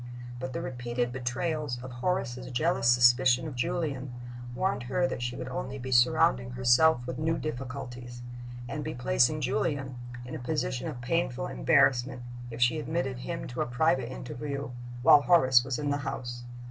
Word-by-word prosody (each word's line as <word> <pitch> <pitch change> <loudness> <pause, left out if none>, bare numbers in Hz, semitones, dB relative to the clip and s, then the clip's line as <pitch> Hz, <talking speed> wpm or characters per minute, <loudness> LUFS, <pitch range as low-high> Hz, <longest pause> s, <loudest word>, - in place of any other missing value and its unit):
But 130 0 -5
the - - -3
repeated 120 -1 -2
betrayals 130 +2 -2
of 130 - -7
Horace's 125 -2 -2
jealous 140 0 +1
suspicion 125 +3 +5
of 150 - -6
Julian 135 +1 -2 0.4
warned 190 0 0
her 175 +7 +2
that 120 - -4
she 120 0 -2
would 125 - -5
only 130 +1 -4
be 130 0 -6
surrounding 125 0 +4
herself 125 +2 +4
with 125 - -5
new 160 +1 +1
difficulties, 125 -3 -6 0.4
and 150 +5 -4
be 155 +1 -4
placing 125 +4 +2
Julian 135 0 -1 0.3
in 125 - -8
a 155 - -4
position - - -2
of 120 - -6
painful - - -1
embarrassment, 120 - +2 0.3
if 115 0 -7
she 125 +6 +3
admitted 150 -5 -2
him 170 +6 -4
to 125 - -3
a - - 0
private 130 -1 +1
interview 140 +2 -5 0.3
while 145 - +8
Horace 130 -7 +5
was 130 0 -2
in 145 -1 -1
the 145 - +1
house. 120 -3 -5
130 Hz, 165 wpm, -29 LUFS, 120-145 Hz, 0.4 s, while